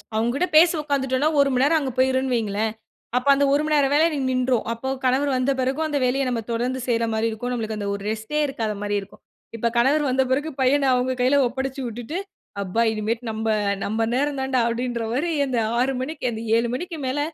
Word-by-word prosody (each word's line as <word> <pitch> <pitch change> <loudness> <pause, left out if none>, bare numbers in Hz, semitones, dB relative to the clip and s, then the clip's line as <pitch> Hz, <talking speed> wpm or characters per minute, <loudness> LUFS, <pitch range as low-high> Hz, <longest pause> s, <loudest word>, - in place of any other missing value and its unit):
அவுங்ககிட்ட 240 +10 +1
பேசி 330 +3 +7
உக்காந்துட்டோன்னா, 280 -1 0
ஒரு 280 0 +4
மணி 255 +1 +2
நேரம் 315 +3 +4
அங்கு 270 -3 -3
போயிரும்ன்னு 260 0 +2
வையுங்களேன்! 215 -1 -1 0.5
அப்ப 250 - -2
அந்த 280 +1 +2
ஒரு 285 - +3
மணி 305 0 +1
நேரம் 280 -2 +3
வேலைய 310 +3 +5
எனக்கு 275 -5 -2
நின்றுரும். 255 -1 +1
அப்போ 230 +3 -7 0.2
கணவர் 265 +3 +2
வந்த 255 +2 +1
பிறகும் 265 +5 0
அந்த 295 -2 -1
வேலைய 255 +2 +1
நம்ம 240 -2 -1
தொடர்ந்து 245 +3 -1
செய்றமாரி 230 -2 0
இருக்கும். 225 +3 -4
நமக்கு 220 -2 -3
அந்த 205 -1 -4
ஒரு 200 - -5
ரெஸ்ட்டே 220 +7 -3
இருக்காத 225 -6 -3
மாரி 205 0 -1
இருக்கும். 195 - -15 0.3
இப்ப 230 +1 -1
கணவர் 275 +6 +3
வந்த 265 +1 +2
பிறகு 290 +4 +1
பையன் 275 +2 +3
அவுங்க 250 +1 +1
கையில 260 +3 +4
ஒப்படச்சு 265 +2 -4
விட்டுட்டு 240 +8 -5 0.5
அப்பா! 195 +4 -1
இனிமேட்டு 220 +2 -2
நம்ப, 220 +1 -2 0.4
நம்ப 220 +2 -1
நேரம் 285 +1 0
தான்டா 265 -1 +1
அப்பிடீன்றமாரி 240 +5 -2 0.2
அந்த 255 -2 -1
6:00 225 +2 -1
மணிக்கு 270 +2 +1
மணிக்கு 275 -1 -3
அந்த 220 - -5 0.2
7:00 235 +1 +1
மணிக்கு 335 +3 -5
மேல 260 +3 -1
255 Hz, 200 wpm, -23 LUFS, 230-275 Hz, 0.5 s, பேசி